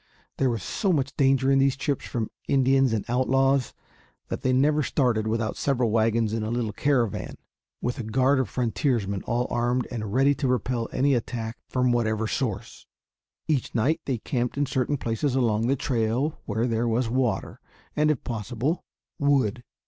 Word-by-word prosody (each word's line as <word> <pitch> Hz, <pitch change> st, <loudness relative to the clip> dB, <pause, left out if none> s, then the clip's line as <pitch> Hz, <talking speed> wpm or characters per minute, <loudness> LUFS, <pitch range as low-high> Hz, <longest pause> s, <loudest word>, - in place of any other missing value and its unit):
There 135 Hz, -, +2 dB
was 115 Hz, -4 st, -2 dB
so 195 Hz, -4 st, 0 dB
much 140 Hz, -5 st, 0 dB
danger 135 Hz, -1 st, +3 dB
in 135 Hz, -, +4 dB
these 135 Hz, -1 st, +3 dB
trips 140 Hz, -1 st, -2 dB
from 115 Hz, -3 st, -3 dB, 0.2 s
Indians 135 Hz, -1 st, +3 dB
and 110 Hz, -3 st, -1 dB
outlaws 135 Hz, +2 st, +2 dB, 0.5 s
that -, -, -4 dB
they 130 Hz, -, +1 dB
never 145 Hz, +4 st, +3 dB
started 120 Hz, -6 st, +1 dB
without 110 Hz, 0 st, -1 dB
several 125 Hz, -5 st, +1 dB
wagons 110 Hz, 0 st, +2 dB
in 115 Hz, -, -1 dB
a 110 Hz, -, -2 dB
little 115 Hz, -3 st, -2 dB
caravan, 120 Hz, -4 st, 0 dB, 0.5 s
with 125 Hz, +2 st, -2 dB
a -, -, -3 dB
guard 130 Hz, +5 st, +2 dB
of 130 Hz, -6 st, -1 dB
frontiersmen 115 Hz, -5 st, -1 dB
all 120 Hz, +1 st, +1 dB
armed 120 Hz, +1 st, 0 dB
and 110 Hz, -4 st, -4 dB
ready 135 Hz, +4 st, +4 dB
to 140 Hz, 0 st, -2 dB
repel 125 Hz, -1 st, -1 dB
any 140 Hz, +2 st, +2 dB
attack 115 Hz, -1 st, -3 dB
from 125 Hz, -1 st, +1 dB
whatever 110 Hz, -2 st, +1 dB
source. 110 Hz, -4 st, -4 dB, 0.6 s
Each 145 Hz, -7 st, -1 dB
night 150 Hz, +8 st, +1 dB
they 130 Hz, -3 st, -1 dB
camped 120 Hz, +2 st, -2 dB
in 145 Hz, -, +2 dB
certain 135 Hz, +1 st, 0 dB
places 125 Hz, +3 st, -1 dB
along 115 Hz, -3 st, +1 dB
the 135 Hz, -, +2 dB
trail 125 Hz, +3 st, -1 dB
where 110 Hz, +2 st, -1 dB
there 115 Hz, 0 st, 0 dB
was 115 Hz, +1 st, +1 dB
water 125 Hz, 0 st, -1 dB, 0.4 s
and, 150 Hz, 0 st, +3 dB
if 150 Hz, -5 st, 0 dB
possible, 120 Hz, -, -2 dB, 0.4 s
wood. 130 Hz, -5 st, +2 dB
125 Hz, 170 wpm, -26 LUFS, 115-135 Hz, 0.6 s, in